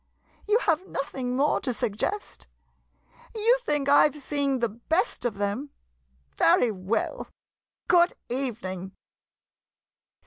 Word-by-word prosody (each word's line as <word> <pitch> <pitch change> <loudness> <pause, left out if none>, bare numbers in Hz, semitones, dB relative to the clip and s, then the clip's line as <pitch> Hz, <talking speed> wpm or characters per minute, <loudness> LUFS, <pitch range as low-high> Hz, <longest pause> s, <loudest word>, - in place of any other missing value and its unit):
You 425 +1 +4
have 355 -4 0
nothing 260 -3 -3
more 285 +3 +2
to 255 - -1
suggest? 225 - -3 0.9
You 460 +3 +3
think 295 - -1
I 285 +1 +6
've 295 - -15
seen 280 -1 -1
the 235 -1 +1
best 315 - -1
of 220 -5 -1
them? 205 +8 -2 0.7
Very 230 +7 +4
well 195 +3 -2 0.3
— - - -62
good 350 0 +5
evening. 210 -8 -4
270 Hz, 115 wpm, -26 LUFS, 225-315 Hz, 0.9 s, I